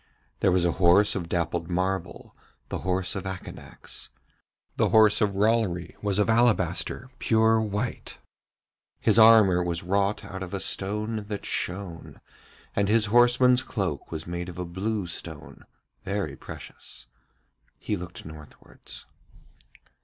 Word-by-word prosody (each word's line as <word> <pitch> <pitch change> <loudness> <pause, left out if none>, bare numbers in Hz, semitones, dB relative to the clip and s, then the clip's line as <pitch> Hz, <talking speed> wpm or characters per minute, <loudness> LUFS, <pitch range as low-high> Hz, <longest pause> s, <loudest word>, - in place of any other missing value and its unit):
There 95 - +3
was 90 -1 +2
a 85 - +2
horse 90 +4 +5
of 85 -4 -4
dappled 85 0 -2
marble, 95 +1 -3 0.3
the - - -3
horse 90 0 -1
of 95 0 -5
Akanax. 95 -2 -8 0.7
The - - +2
horse 110 -2 +5
of 100 -2 +1
Rollory 100 -5 0
was 100 -2 -1
of 105 - +2
alabaster, 115 +1 +1
pure 110 0 +3
white, 105 -2 -4 0.8
his - - +3
armour 110 -5 +7
was 85 -1 -2
wrought 100 +3 0
out 95 -1 -7
of 95 +1 -5
a - - -3
stone 105 +3 -2
that 105 -2 -5
shone, 90 -3 -4 0.6
and 100 0 +1
his 110 0 +4
horseman's 125 +1 +5
cloak 95 - -4
was 80 -1 -5
made 85 +1 -5
of 90 - -10
a 90 - -3
blue 100 +4 -3
stone, 80 -2 -7 0.4
very 100 +1 -3
precious. - - -11 0.7
He 105 - -3
looked 90 -1 -9
northwards. 75 -2 -12
95 Hz, 135 wpm, -26 LUFS, 90-110 Hz, 0.8 s, armour